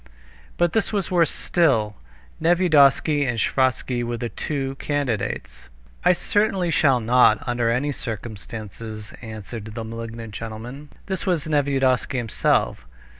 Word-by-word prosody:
But 175 -1 +2
this 225 - +1
was 200 -5 -1
worse 170 -3 +4
still. 115 -12 +1 0.5
Nevyedovsky 155 -4 +4
and 120 -4 -1
Sviazhsky 125 0 +1
were 120 0 -3
the 120 0 -3
two 135 -1 -3
candidates. 110 - -3 0.3
"I - - +6
certainly 195 -1 +1
shall 135 -6 +4
not, 120 -1 +4
under 120 -1 +1
any 130 +5 +1
circumstances," 110 -2 -7
answered 110 -1 -7
the 115 - -4
malignant 115 0 -7
gentleman. 115 +7 -7 0.2
This 190 -1 -3
was 175 -5 +1
Nevyedovsky 135 -4 +1
himself. 110 - 0
125 Hz, 125 wpm, -23 LUFS, 115-150 Hz, 0.5 s, I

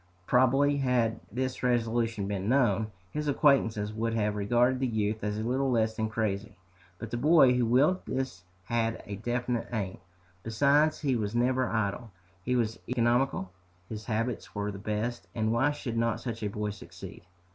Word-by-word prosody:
Probably 135 +5 +3
had 125 -4 +1
this 130 +1 -3
resolution 115 -4 0
been 100 0 -2
known, 110 -5 +2 0.2
his 150 0 -3
acquaintances 115 -8 +2
would 115 +1 -1
have 105 -2 0
regarded 120 +5 +2
the 130 - +1
youth 110 -2 -1
as 105 0 -1
little 130 +5 0
less 110 -3 +1
than 110 -1 -1
crazy. 105 -1 -2 0.4
But - - -7
the 120 - -1
boy 145 -1 +6
who 125 -2 +1
willed 145 +10 +3
this 130 -8 -3 0.2
had 115 +2 -1
a 100 -1 -6
definite 120 +1 -2
aim. 100 -6 -3 0.4
Besides, 140 +8 +2
he 135 -4 +1
was 105 -1 -2
never 125 +1 +2
idle, 110 +1 -2 0.3
he 125 +4 0
was 115 -2 0
economical, 120 -4 +1 0.4
his 110 -1 -6
habits 110 -4 -3
were 105 0 -2
the 100 - -8
best, 110 +4 -3
and 110 -1 +1
why 130 +5 +3
should 125 -5 -4
not 115 -1 0
such 115 -1 -5
a 105 - -1
boy 105 +1 -3
succeed? 100 - -10
115 Hz, 170 wpm, -29 LUFS, 110-125 Hz, 0.4 s, boy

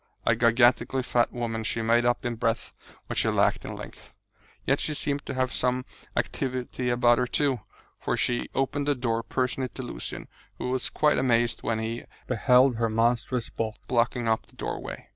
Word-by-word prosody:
A 115 - +4
gigantically 120 +2 +3
fat 120 -1 +2
woman, 115 -2 -3
she 115 +1 -1
made 120 +1 +3
up 120 +1 +1
in 120 - 0
breadth 115 0 -1 0.3
what - - -5
she - - +3
lacked - - +2
in - - -5
length. - - -11 0.5
Yet - - +2
she 150 - -1
seemed 145 -1 -2
to - - -3
have 130 -1 0
some 125 0 0 0.3
activity 125 -1 -2
about 120 0 +4
her, 125 - +1
too, 135 -1 +1 0.4
for - - -1
she 120 -1 0
opened 140 +1 0
the 145 - +3
door 115 -3 0
personally 130 +2 -1
to 130 - -5
Lucian, 120 - -6 0.3
who 125 - -3
was 130 -1 0
quite 150 -1 +2
amazed 120 -2 +2
when 115 - -1
he 115 +2 -4 0.2
beheld 125 0 +4
her 115 -1 +1
monstrous 120 +2 0
bulk 110 -2 -3
blocking 120 -1 +1
up 110 0 +1
the - - -22
doorway. - - -5
120 Hz, 180 wpm, -27 LUFS, 115-130 Hz, 0.5 s, A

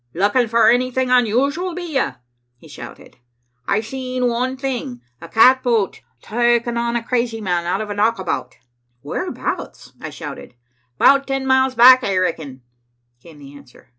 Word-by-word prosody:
"Lookin' 205 +7 +1
for 230 0 +3
anything 255 +2 +1
unusual, 275 - +1
be 360 - -5
ye?" 270 - +1 0.5
he - - -17
shouted. - - -12 0.5
"I've 215 +2 0
seen 255 +1 -3
one 250 +2 -2
thing, 255 - -4 0.2
a 170 - -10
catboat 235 0 +3 0.2
takin' 240 +1 0
on 235 0 -1
a 235 - -2
crazy 235 -2 -2
man 175 -4 -2
out 190 +4 -1
of 210 -1 -5
a - - -2
knockabout." 190 - -2 0.5
"Whereabouts?" - - -5
I - - -6
shouted. - - -9 0.4
"'Bout 275 - +4
ten 270 -1 -2
miles 260 0 +2
back, 255 +2 +7
I 195 -2 -1
reckon," 155 -8 -3 0.6
came 160 +1 -16
the 140 -1 -13
answer. 140 -2 -18
235 Hz, 150 wpm, -19 LUFS, 190-255 Hz, 0.6 s, back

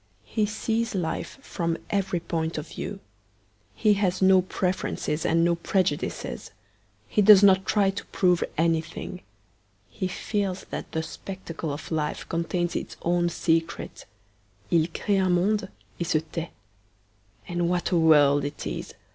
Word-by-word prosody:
He 215 -2 0
sees 225 +1 -1
life 165 +4 -3
from 170 -8 -2
every 195 -3 0
point 165 -1 -2
of 150 - -5
view. - - -6 0.7
He 215 -2 +4
has 190 -2 0
no 190 -1 +6
preferences 180 -4 -2
and 165 +1 +3
no 170 - +3
prejudices. 170 -2 -1 0.6
He 160 - +2
does 205 -1 +8
not 190 -1 +5
try 200 -2 +3
to 195 - -7
prove 180 -2 +2
anything. 165 0 -1 0.7
He 190 - -2
feels 195 0 -2
that - - -5
the 160 - -1
spectacle 165 -3 -6
of 145 +4 -7
life 150 -2 -2
contains 175 +1 -1
its - - -4
own 175 0 +2
secret. 165 0 -1 0.6
'II 165 -2 +4
cree 195 +3 0
un 185 -1 +2
monde 195 +2 +1 0.3
et 170 - -2
se 155 - +2
tait.' 165 0 -4 1.0
And 175 -1 0
what 180 +1 0
a 175 - +3
world 145 -3 +5
it 145 +1 -5
is! - - -5
175 Hz, 145 wpm, -26 LUFS, 165-190 Hz, 1.0 s, does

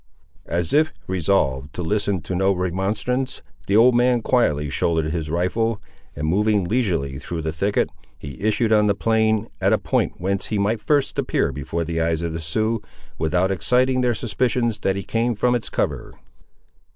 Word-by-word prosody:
As 85 0 -1
if 155 +1 +4
resolved 80 -7 0
to 90 - -3
listen 100 0 0
to 95 - -5
no 95 +2 +2
remonstrance, 100 +8 -2 0.2
the 100 - +2
old 120 +3 +6
man 120 -1 +3
quietly 75 - +2
shouldered 80 +2 0
his 80 -2 -3
rifle, 100 +7 0 0.4
and 75 - -3
moving 105 +3 +2
leisurely 85 - -1
through 80 +2 -5
the 80 - -1
thicket, 100 +6 0 0.3
he 70 -2 -9
issued 110 +1 +2
on 105 -1 +4
the 100 - +2
plain, 110 0 +1
at - - +3
a - - +4
point - - 0
whence 95 +2 -1
he 110 - -1
might 105 +2 0
first 145 +1 +1
appear - - 0
before 75 +5 -3
the 80 0 -2
eyes 80 0 0
of 85 -1 -2
the 80 - -3
Siouxes, 110 +7 -1 0.4
without 90 +4 +1
exciting 125 +8 +2
their 120 -2 +2
suspicions 120 -1 0
that 95 -2 0
he 100 - -4
came 115 +4 0
from 125 +4 +2
its 120 - -1
cover. - - -2
100 Hz, 175 wpm, -22 LUFS, 85-115 Hz, 0.4 s, old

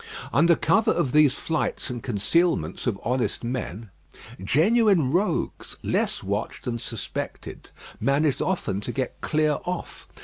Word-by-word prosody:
Under 170 +5 +5
cover 165 +9 +2
of 130 - +1
these 150 -2 +5
flights 155 -4 -2
and 120 -1 -5
concealments 135 - 0
of 105 -5 -1
honest 125 +1 -1
men, 115 -4 -4 0.5
genuine 180 - +3
rogues, 185 +6 -1
less - - 0
watched - - -3
and 120 -2 -3
suspected, 115 -2 -6 0.3
managed 140 +1 +1
often 170 - -1
to 120 - -4
get 130 0 -4
clear 155 -1 +1
off. 180 -1 -5
140 Hz, 130 wpm, -25 LUFS, 120-170 Hz, 0.5 s, Under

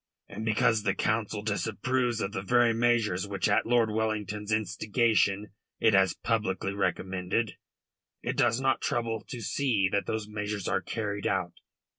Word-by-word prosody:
And 110 - -7
because 110 0 +2
the 100 -1 0
Council 110 -1 -1
disapproves 115 +3 -1
of 100 - -2
the 95 - -3
very 120 +3 +3
measures 115 -5 +1
which 100 -1 -1
at 100 - +2
Lord 115 -2 +3
Wellington's 105 -1 -2
instigation 105 0 +1 0.3
it 110 -2 +4
has 95 -2 +4
publicly 105 -5 0
recommended, 95 +2 -1 0.7
it - - -2
does 120 0 +2
not 135 -1 +1
trouble 115 -2 -1
to 125 - -6
see 110 -4 +1
that 100 -1 0
those 110 -1 -2
measures 105 -2 -4
are 95 - +1
carried 105 -1 -3
out. 95 -3 -1
105 Hz, 150 wpm, -29 LUFS, 100-115 Hz, 0.7 s, it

